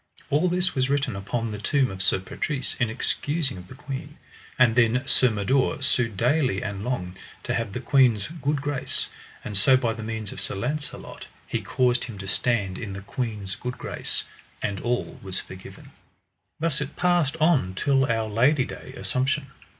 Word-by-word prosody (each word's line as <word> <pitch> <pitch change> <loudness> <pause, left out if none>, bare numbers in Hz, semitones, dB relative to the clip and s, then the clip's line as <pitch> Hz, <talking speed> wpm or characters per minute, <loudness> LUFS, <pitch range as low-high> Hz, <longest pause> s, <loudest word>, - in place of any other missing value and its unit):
All 155 +6 +3
this 180 +1 +2
was 130 0 +1
written 140 -6 +1
upon 110 +4 -2
the 105 - -5
tomb 135 +4 +2
of 95 0 -4
Sir - - +3
Patrise 130 +8 -2
in 120 -3 +2
excusing 145 +5 -1
of 90 - -11
the 130 - -11
queen. 145 +1 -6 0.4
And 120 -3 +5
then 125 +1 +4
Sir 130 -1 +4
Mador 110 +5 +1
sued 120 -7 +1
daily 125 -3 +2
and 100 -1 -4
long, 100 -7 -2 0.3
to - - -1
have 115 -3 -1
the 110 - -3
queen's 125 -7 +4
good 150 -3 -2
grace; 145 -2 -1 0.3
and 105 - -5
so 130 +7 +6
by 120 -3 0
the 110 - -7
means 110 -1 -4
of - - -6
Sir - - -2
Launcelot 140 +9 -4 0.2
he - - -2
caused 125 -2 +2
him 115 -5 -8
to 95 0 -7
stand 100 -2 0
in 105 -5 -5
the 100 - -6
queen's 105 -3 -3
good 125 0 -5
grace, - - -2 0.4
and 100 -2 -2
all 120 +3 -2
was 95 -2 -4
forgiven. 95 0 -11 0.7
Thus 155 -2 0
it 150 - -4
passed 175 -4 +2
on 150 - +3
till 135 +5 +3
our 115 -2 0
Lady 130 +6 +3
Day, 130 - -9
Assumption. 135 +2 0
125 Hz, 180 wpm, -26 LUFS, 105-140 Hz, 0.7 s, so